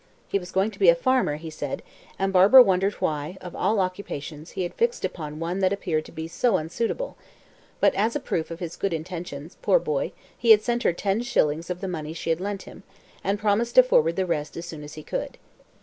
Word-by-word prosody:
He 200 - 0
was 180 -1 -10
going 195 +3 +1
to 200 - -15
be 190 -4 +6
a 170 - +7
farmer, 250 - +1
he 160 +1 -8
said, 145 -3 -5 0.3
and 195 0 0
Barbara 200 +8 +9
wondered 195 -1 +1
why, 155 +4 -2
of 180 -2 -9
all 215 -1 +1
occupations, 175 -5 -4
he 185 - 0
had 175 - -4
fixed 475 +1 0
upon 150 -2 -5
one 170 +3 -2
that 190 -1 +2
appeared 165 -6 -1
to - - -12
be 160 +1 -6
so 190 +5 +2
unsuitable; 230 - -3 0.6
but, - - +4
as 220 +4 0
a - - +1
proof 170 - -2
of 165 0 -7
his 170 -2 -5
good 195 -3 -1
intentions, 165 -2 -6
poor - - +4
boy, - - -1 0.2
he 235 - -1
had 215 -1 +8
sent 240 0 0
her 175 - +2
ten 195 +5 0
shillings 165 -8 0
of 180 0 -4
the 195 - -3
money 160 -3 -4
she 165 0 -2
had 165 +2 0
lent 200 0 -3
him, - - -12 0.4
and 200 +2 0
promised 215 +3 0
to 255 - +10
forward 165 -9 +3
the 190 - 0
rest 150 -4 -3
as 170 - -5
soon 160 -3 -8
as 150 0 -10
he 155 - -9
could. - - -4
185 Hz, 230 wpm, -25 LUFS, 160-205 Hz, 0.6 s, to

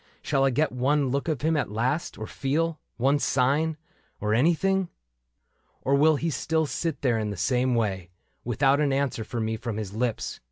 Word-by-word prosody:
Shall 135 -2 +1
I - - +4
get 150 +5 +1
one 135 +2 +1
look 140 +4 -1
of 155 -6 -1
him 160 +1 +2
at 150 - 0
last, 125 +10 -1
or 110 - -5
feel 155 +7 -1 0.2
One 135 +4 +2
sign 145 +5 +1 0.2
— - - -39
or 105 0 0
anything? 175 - +2 0.9
Or 135 - +1
will 155 +3 +5
he 160 +3 -1
still 160 +2 0
sit 155 -1 -3
there 120 -4 +2
in 105 -1 -2
the 100 - -5
same 125 +6 +1
way. 95 -6 -1 0.3
Without 135 +4 +2
an 145 -2 +2
answer 135 -4 0
for 115 +2 -5
me 110 0 -1
from 110 -1 -4
his 105 -3 -5
lips. 115 +1 -2
135 Hz, 195 wpm, -26 LUFS, 115-150 Hz, 0.9 s, will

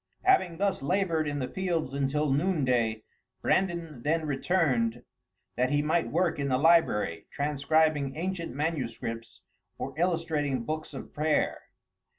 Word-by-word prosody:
Having 370 - +3
thus 200 0 0
labored 165 0 +1
in 145 0 -2
the 130 -3 -2
fields 170 -6 -2
until 140 +1 0
noonday, 130 -9 +1 0.4
Brandan 170 -8 0
then 160 +4 0
returned 135 -6 +1 0.5
that 125 +1 +2
he 145 +1 +2
might 160 +3 +1
work 175 -4 +1
in 140 - -1
the 130 -1 +2
library, 150 - +3
transcribing 145 0 +1
ancient 175 0 -3
manuscripts 115 -7 -3 0.4
or 135 - -5
illustrating 160 -7 0
books 155 +5 -4
of - - -8
prayer. 150 0 +1
150 Hz, 130 wpm, -28 LUFS, 135-165 Hz, 0.5 s, Having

